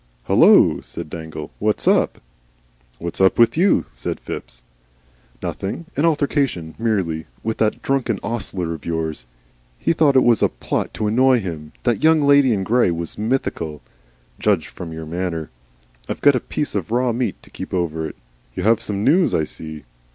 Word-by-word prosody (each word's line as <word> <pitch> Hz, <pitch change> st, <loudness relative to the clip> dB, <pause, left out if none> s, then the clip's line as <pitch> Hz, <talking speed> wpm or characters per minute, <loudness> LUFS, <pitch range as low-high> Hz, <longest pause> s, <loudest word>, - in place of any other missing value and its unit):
"Hullo!" -, -, +5 dB
said 75 Hz, -, -8 dB
dangle. 80 Hz, -2 st, -7 dB
"What's 105 Hz, 0 st, 0 dB
up?" -, -, +3 dB, 0.8 s
"What's 85 Hz, +2 st, -5 dB
up 95 Hz, -, +4 dB
with 115 Hz, -1 st, +5 dB
YOU?" 185 Hz, +5 st, +3 dB
said -, -, -4 dB
Phipps. -, -, -7 dB, 0.8 s
"Nothing 100 Hz, -, -4 dB
an 145 Hz, -, +2 dB
altercation 140 Hz, -, 0 dB
merely 95 Hz, -9 st, -1 dB, 0.2 s
with 110 Hz, 0 st, -2 dB
that 110 Hz, -1 st, 0 dB
drunken 130 Hz, -6 st, 0 dB
ostler 95 Hz, -6 st, -3 dB
of 80 Hz, -, -9 dB
yours. 80 Hz, -6 st, -3 dB, 0.5 s
He 165 Hz, -, +1 dB
thought 150 Hz, -4 st, +3 dB
it 130 Hz, -, +6 dB
was 120 Hz, -3 st, +4 dB
a -, -, +4 dB
plot -, -, -3 dB
to 110 Hz, -, -2 dB
annoy 125 Hz, +4 st, +4 dB
him 80 Hz, -6 st, -6 dB
that 120 Hz, -3 st, +2 dB
the -, -, -16 dB
Young 160 Hz, -1 st, +5 dB
Lady 140 Hz, -2 st, +5 dB
in 100 Hz, -4 st, 0 dB
Grey 120 Hz, +1 st, +3 dB
was 85 Hz, +2 st, -4 dB
mythical. 105 Hz, -, -2 dB, 0.6 s
Judged -, -, +1 dB
from 85 Hz, -2 st, -8 dB
your 80 Hz, 0 st, -6 dB
manner. 85 Hz, -1 st, -3 dB, 0.6 s
I've -, -, -3 dB
got 145 Hz, -, +6 dB
a 125 Hz, -, +1 dB
piece 150 Hz, +5 st, -3 dB
of 95 Hz, -5 st, -2 dB
raw 125 Hz, +2 st, +1 dB
meat 120 Hz, +1 st, -1 dB
to -, -, -17 dB
keep -, -, -7 dB
over 80 Hz, -3 st, -1 dB
it. -, -, -9 dB, 0.4 s
You -, -, -3 dB
have 115 Hz, +1 st, +3 dB
some 100 Hz, -1 st, -2 dB
news, 170 Hz, -, +3 dB
I 80 Hz, -, +2 dB
see?" 80 Hz, 0 st, -8 dB
105 Hz, 175 wpm, -21 LUFS, 80-130 Hz, 0.8 s, it